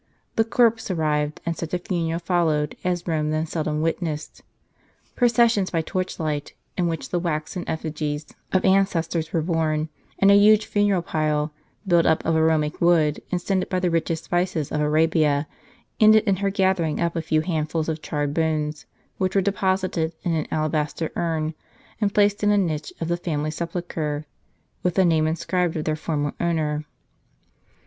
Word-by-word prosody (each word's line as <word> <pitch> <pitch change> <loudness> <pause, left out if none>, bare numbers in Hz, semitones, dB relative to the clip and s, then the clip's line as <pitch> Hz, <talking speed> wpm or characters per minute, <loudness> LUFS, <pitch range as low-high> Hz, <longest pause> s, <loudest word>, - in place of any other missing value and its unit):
The 225 - +4
corpse 230 -1 +2
arrived, 150 -4 0
and 170 0 -1
such 165 +2 -3
a - - +2
funeral 170 -3 -2
followed 165 -4 0
as 175 -1 -1
Rome 155 -2 0
then 155 +1 0
seldom 155 -1 -2
witnessed. 160 -2 -3 0.7
Processions 235 -5 +3
by 165 -2 0
torch 185 +2 -3
light, 150 -3 -3 0.2
in 180 -2 +1
which 165 -1 -3
the 175 - +1
waxen 170 +1 -3
eftigies 155 -1 -3 0.3
of 185 - +2
ancestors 170 -4 +1
were 165 - 0
borne, 160 -2 0 0.3
and 195 0 +5
a - - +7
huge 210 +1 +6
funeral 205 -4 +1
pile, 150 -1 -1 0.3
built 175 -2 +4
up 160 - +2
of 165 - +2
aromatic 160 -1 +1
wood, 165 -4 +3
and 180 - +1
scented 185 +1 -1
by 185 - 0
the 180 -1 0
richest 165 -1 -1
spices 175 -4 -1
of 150 - 0
Arabia, 155 -1 +2 0.5
ended 215 0 +7
in 200 -3 +1
her 200 +1 0
gathering 190 -5 +1
up 170 0 0
a 165 - 0
few 155 -1 +1
handfuls 155 -1 -1
of 160 -1 -3
charred 145 -2 -2
bones, 155 -1 -1 0.3
which 185 0 0
were - - +5
deposited 185 -4 0
in 175 - 0
an 155 -2 -1
alabaster 155 +1 -1
urn, 160 -2 -1 0.5
and 205 -2 +1
placed 205 0 +3
in 205 - +4
a 205 - +4
niche 160 -6 -1
of 165 - -2
the 175 0 0
family 155 -3 -2
sepulchre, 160 -3 -3 0.6
with 180 -2 0
the 190 - +4
name 160 -2 +3
inscribed 170 +1 -1
of 155 - -3
their 155 - 0
former 150 -2 -2
owner. 155 -3 0
165 Hz, 170 wpm, -23 LUFS, 155-185 Hz, 0.7 s, a